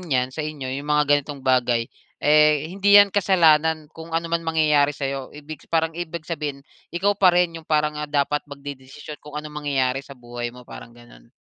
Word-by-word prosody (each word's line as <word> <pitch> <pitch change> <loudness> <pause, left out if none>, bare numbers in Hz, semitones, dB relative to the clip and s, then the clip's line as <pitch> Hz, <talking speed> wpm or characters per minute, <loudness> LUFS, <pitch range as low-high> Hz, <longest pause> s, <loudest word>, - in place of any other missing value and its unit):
'yan 130 -7 -1
sa 155 - -5
inyo 145 -4 -5
'yong 140 +2 -6
mga 150 0 +3 0.2
ganitong 140 -1 -10
bagay, 120 -2 +2 0.3
eh, 150 0 +4
hindi 200 +1 +5
'yan 200 -1 +7
kasalanan 160 -5 +3
kung 165 0 -6
ano 165 - -1
man 170 - +1
mangyayari 150 -3 +2
sa 140 - -4
'yo. 135 -1 -4
Ibig 150 +1 -11
parang 160 0 0
ibig 170 -1 -6
sabihin, 145 -3 -5 0.2
ikaw 195 +4 +1
pa 195 -2 +4
rin 175 -1 +2
'yong 155 - -25
parang, 150 -1 0
ah, 150 - -5
dapat 145 0 0
magdedesisyon 140 +1 -10
kung 150 0 -10
anong 150 0 -6
mangyayari 135 -2 0
sa 140 -1 -13
buhay 120 0 -6
mo, 125 +1 -13
parang 120 0 -12
gano'n? 120 - -18
150 Hz, 195 wpm, -23 LUFS, 135-160 Hz, 0.3 s, yan